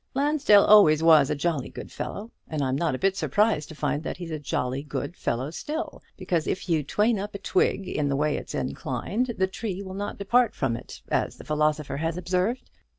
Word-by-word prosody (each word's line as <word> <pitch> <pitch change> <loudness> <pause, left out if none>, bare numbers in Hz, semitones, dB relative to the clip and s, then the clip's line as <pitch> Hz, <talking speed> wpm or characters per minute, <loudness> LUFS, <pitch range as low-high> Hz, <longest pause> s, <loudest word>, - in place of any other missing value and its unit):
Lansdell 275 -7 +4
always 165 -7 +7
was 155 -4 +6
a 150 - 0
jolly 150 -2 -1
good - - -9
fellow, 215 +4 -6 0.2
and 155 -3 -2
I'm 130 0 0
not 155 -1 0
a - - -3
bit 195 +6 +1
surprised 205 -8 +1
to 155 - -9
find 150 -1 -1
that - - -5
he's 175 -2 -7
a 155 - -3
jolly 130 -2 -2
good 145 +2 -5
fellow 130 +1 -2
still; 310 - -5 0.2
because 180 -4 -1
if 185 - -2
you 165 -3 +2
train 210 - +1
up 205 +1 -5
a - - -1
twig 195 0 0
in 145 -5 -1
the 140 - +1
way 150 +2 +1
it's - - -6
inclined, 235 +2 -2
the 190 - +3
tree 195 0 -5
will 190 -1 -8
not 205 +1 -4
depart 235 +4 +2
from 125 -4 0
it, 120 - -10
as - - 0
the - - -11
philosopher 150 -2 0
has 165 +3 -2
observed. 185 +7 -1
175 Hz, 215 wpm, -26 LUFS, 150-205 Hz, 0.2 s, always